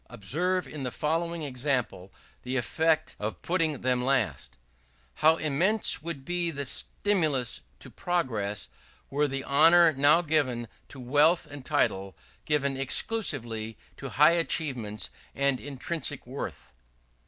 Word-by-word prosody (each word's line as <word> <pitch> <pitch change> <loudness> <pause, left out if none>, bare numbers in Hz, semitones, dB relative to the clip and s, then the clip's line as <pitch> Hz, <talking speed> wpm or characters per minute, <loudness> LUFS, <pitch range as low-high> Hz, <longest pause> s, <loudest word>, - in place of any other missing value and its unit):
Observe 170 - -1
in 150 - -7
the 130 - -2
following 165 +4 -2
example 125 -8 -2 0.3
the 130 +1 -2
effect 155 +6 +1
of 105 +1 -4
putting 165 -5 0
them 125 -1 +1
last: 125 - -1 0.6
"How 160 +1 +6
immense 170 +10 +2
would 150 -4 -5
be 175 -1 -1
the 140 -3 -4
stimulus 155 - 0 0.2
to - - -12
progress, 115 - -2 0.4
were 145 +2 +2
the 135 0 -3
honour 165 +4 +6
now 145 +5 +4
given 135 -7 0 0.2
to 135 - -11
wealth 145 +7 +3
and 145 -2 -10
title 100 -10 0 0.3
given 140 -2 +1
exclusively 125 - 0 0.2
to 135 - -6
high 150 +3 +7
achievements 135 -11 -2 0.2
and 140 -2 +1
intrinsic 145 +1 -5
worth!" 130 +3 -7
145 Hz, 125 wpm, -28 LUFS, 125-165 Hz, 0.6 s, high